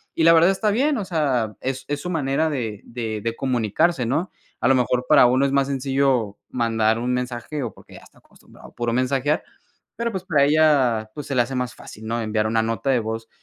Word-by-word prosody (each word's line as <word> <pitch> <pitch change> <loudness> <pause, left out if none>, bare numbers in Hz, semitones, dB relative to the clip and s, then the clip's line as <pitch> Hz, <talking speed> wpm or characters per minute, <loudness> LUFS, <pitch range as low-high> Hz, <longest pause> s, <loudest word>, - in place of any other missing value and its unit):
y 165 - +1
la 165 - +7
verdad 165 +3 +5
está 210 +3 0
bien, 275 +7 +1
o 210 - -2
sea, 135 - 0
es 130 0 -3
es 145 0 -1
su 180 - -5
manera 155 -1 0
de 115 -8 -4
de 115 -3 -4
de 115 +2 -3
comunicarse, 130 - 0
¿no?, 155 +10 -1 0.3
a - - +2
lo 135 - +5
mejor, 125 0 +1
para 150 -4 +7
uno 130 +3 +2
es 140 - 0
más 140 -1 +2
sencillo 135 -5 0
mandar 115 -2 +1
un 125 +1 -1
mensaje, 125 +3 -3
o 115 -5 -5
porque - - -18
ya - - -12
está - - -20
acostumbrado - - -18
a - - -26
puro 120 -1 -2
mensajear, 135 +4 0 0.5
pero, 235 0 -1
pues, 190 -1 -4
para 150 -6 +3
ella, 140 -8 +3
pues, 150 - -6
se 140 - -3
le 125 - +4
hace 120 +3 -3
más 125 -3 -2
fácil, 110 - -12
¿no?, 115 +1 -1
enviar 110 -1 0
una 110 0 +1
nota 115 +4 -2
de 130 -3 +3
voz. 115 0 -5
130 Hz, 230 wpm, -22 LUFS, 115-150 Hz, 0.5 s, la